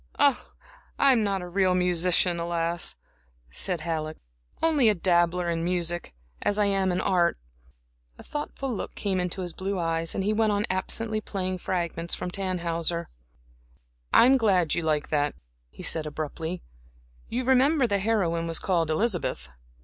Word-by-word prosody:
"I 285 -3 +4 0.7
am 235 -4 +3
not 195 -3 -1
a - - -6
real 185 0 +2
musician, 180 0 +2
alas!" 170 0 -1 0.6
said 175 - -2
Halleck, 155 -1 -3 0.4
"only 295 -8 +4
a 210 - +3
dabbler 175 0 +2
in 165 -1 -1
music, 175 - -1 0.3
as 205 - 0
I 210 - +3
am 195 -2 +1
in 180 - 0
art." 175 -2 +2 0.8
A - - -12
thoughtful 275 -3 -4
look 205 - -5
came 195 -3 -1
into 180 +1 -2
his 175 -2 -5
blue 195 +1 -3
eyes, 165 -1 -1
and 195 - -1
he 210 +2 +1
went 215 -1 +2
on 205 +1 +1
absently 215 +3 -1
playing 185 -3 -3
fragments 170 -2 -2
from 180 - -5
Tannhäuser. 170 -3 -1 1.0
"I - - +7
am 265 +2 +6
glad 190 - +2
you 175 - 0
like 155 -2 0
that," 145 -1 0 0.3
he - - -11
said, 155 -1 +1
abruptly. 160 +3 -5 0.7
"You 245 +3 -1
remember 265 +3 +4
the 200 -4 +1
heroine 185 -6 0
was 165 -1 0
called 170 -4 0
Elizabeth." 180 - -1
180 Hz, 155 wpm, -26 LUFS, 170-205 Hz, 1.0 s, I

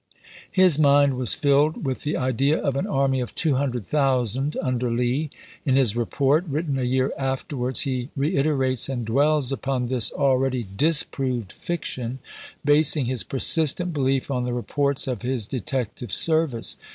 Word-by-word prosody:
His 185 -5 +4
mind 140 -1 +4
was 125 -2 0
filled 145 +2 +2
with 130 -1 -2
the 150 - -2
idea 130 +4 +1
of 140 - -1
an 160 +9 -1
army 135 -5 +1
of 125 - -5
200,000 135 - 0
under 125 -2 -1
Lee. 125 +6 -1 0.3
In 135 -3 +1
his 125 -6 +3
report, 135 +6 +1
written 150 +1 -2
ibid, 135 - -1
a 125 - -1
year 130 +1 0
afterwards, 130 -1 -2
he 130 -2 -3
reiterates 140 -4 0
and 125 -4 -3
dwells 140 +3 +2
upon 135 -2 -2
this 125 -2 0
already 130 -3 +1
disproved 130 - +1
fiction, 130 -7 -4 0.5
basing 145 -1 +4
his 125 0 -1
persistent 160 +5 0
belief 135 -1 0
on 125 -2 -1
the 125 0 -2
reports 140 +3 -1
of 125 -6 -3
his 125 -3 -1
detective 125 -2 -4
service. 160 -8 +1
135 Hz, 150 wpm, -23 LUFS, 125-145 Hz, 0.5 s, His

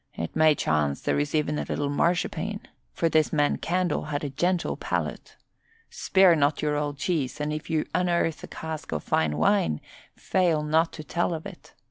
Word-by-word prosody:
It 85 - -5
may 155 -1 +5
chance 75 - 0
there - - 0
is 145 +1 -1
even 150 -1 0
a - - -1
little 140 -1 -2
marchpane, 180 +6 0 0.3
for 165 - 0
this 155 -1 +2
man 145 -2 +2
Candle 180 -2 0
had 150 0 -3
a 145 - -3
gentle 175 +6 0
palate. - - -4 0.5
Spare 190 -3 +4
not 145 -1 +2
your 150 -1 0
old 145 -1 -2
cheese, 150 -3 -1
and 150 +1 -1
if 155 +1 -6
you 160 -2 0
unearth 170 -2 0
a - - -6
cask 160 -1 -6
of 75 - -3
fine 75 -2 +1
wine 80 -2 +2 0.4
fail 170 -5 +1
not 160 +2 +2
to 155 - -7
tell 170 +2 -1
of 160 - -7
it. 195 -3 -11
155 Hz, 185 wpm, -26 LUFS, 145-170 Hz, 0.5 s, may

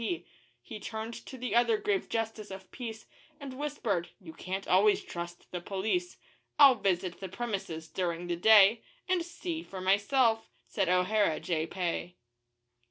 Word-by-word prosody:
P. 175 -5 -2 0.4
He 215 - -8
turned 220 +2 -5
to 260 - -8
the 250 0 -3
other 245 - +4
grave 415 -2 -1
Justice 225 -2 -3
of 190 -1 -10
Peace, 225 -4 -7 0.3
And 280 -3 -7
whispered, 225 - -2
'You 170 -5 -11
can't 190 +4 -5
always 200 +3 +4
trust 175 0 -8
the 180 - -4
police; 220 - -2 0.4
'I'll 280 -2 +9
visit 185 -5 -1
the 190 - -6
premises 195 -7 -4
during 175 -1 -2
the 175 0 -1
day, 215 +3 +7 0.3
And 365 -2 +1
see 340 -1 -5
for 195 - -8
myself,' 220 +5 +2 0.2
said 195 -4 -1
O'Hara, 180 -1 +2
Jay 160 -2 -1
Pay. 175 -1 -3
205 Hz, 155 wpm, -30 LUFS, 180-240 Hz, 0.4 s, I'll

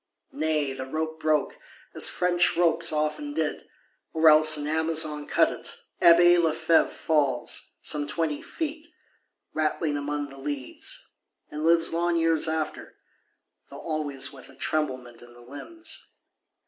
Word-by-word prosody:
Nay, 155 -3 -1
the 130 0 -6
rope 160 +2 -4
broke, 155 -2 0 0.3
as - - +1
French 175 -1 +2
ropes 170 -1 +3
often 155 - -2
did; - - -3 0.4
or 160 0 +5
else 155 0 +6
an 145 - -4
Amazon 155 -1 +1
cut - - +3
it. - - -9 0.3
Abbé 175 +1 +7
Lefevre 160 0 +2
falls, 140 -6 -1
some 145 -1 -1
twenty 150 0 -2
feet, 315 0 -5 0.7
rattling 155 -1 -1
among 145 0 -3
the 135 0 -13
leads; 140 -2 -5 0.4
and 150 +1 -5
lives 165 0 +3
long 170 0 +1
years 165 -1 +2
after, 160 -1 -4 0.7
though - - -10
always 145 -5 -2
with 135 - -13
"a - - -16
tremblement 130 -6 -3
in 120 0 -15
the 120 - -16
limbs." 320 - -8
155 Hz, 135 wpm, -26 LUFS, 145-165 Hz, 0.7 s, Abbé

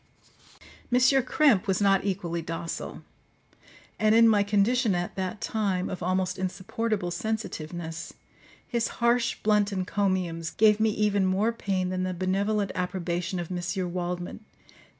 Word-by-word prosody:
M. 250 - +4
Krempe 260 -3 +4
was 190 - +1
not 195 -2 +3
equally 180 -4 -2
docile; 165 +1 -5 1.0
and 215 0 +4
in 230 0 +7
my 210 -2 +4
condition 205 +2 +2
at 175 0 -3
that 190 +1 -4
time, 195 -4 -1
of 185 - -5
almost 185 +1 -1
insupportable 195 +1 -2
sensitiveness, 175 -5 -4 0.6
his 235 -2 0
harsh 235 0 +2
blunt 210 -1 +3
encomiums 185 -4 -1
gave 210 -1 +4
me 220 0 +3
even 210 -2 +1
more 200 +5 +2
pain 190 -5 -2
than 185 0 -2
the 185 0 -2
benevolent 195 +3 0
approbation 180 0 -2
of 175 0 -5
M. 180 0 -3
Waldman. 180 +3 -4
190 Hz, 130 wpm, -27 LUFS, 180-215 Hz, 1.0 s, in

